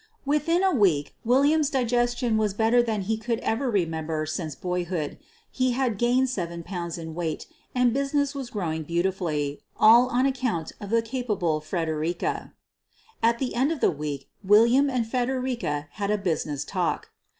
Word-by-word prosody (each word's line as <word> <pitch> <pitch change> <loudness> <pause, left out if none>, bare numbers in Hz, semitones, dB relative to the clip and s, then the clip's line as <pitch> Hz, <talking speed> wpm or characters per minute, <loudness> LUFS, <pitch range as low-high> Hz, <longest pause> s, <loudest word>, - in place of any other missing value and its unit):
Within 300 +5 +2
a 380 - +3
week, 180 - +2
William's 285 +5 +3
digestion 240 -2 +1
was 210 -2 +1
better 225 +3 +4
than 220 -3 -1
he 220 +3 -1
could 230 +1 -2
ever 245 +4 0
remember 160 -6 -1
since 155 -1 -4
boyhood; 180 -4 -3 0.3
he 255 -1 +1
had 245 -5 0
gained 250 +2 +3
seven 170 -8 -4
pounds 170 -2 -5
in 160 -1 -7
weight 165 -2 -3 0.3
and 250 -2 +3
business 280 +1 0
was 270 -4 -5
growing 165 -8 -3
beauti 170 +4 0
fully 150 -6 -3
— - - -36
all 235 +3 +7
on 255 +1 +1
account 255 - -1
of 205 - -6
the 230 +1 +2
capable 210 -10 -1
Fredericka. 160 0 -2 0.7
At 230 +1 +3
the 255 0 -2
end 265 +6 +2
of 325 - -2
the - - +3
week, 145 -3 -5 0.2
William 235 +8 +5
and 250 -3 0
Fredericka 245 - -2
had 200 +2 -3
a 210 - +2
business 155 -7 -2
talk. 180 -3 -2
220 Hz, 165 wpm, -26 LUFS, 170-250 Hz, 0.7 s, all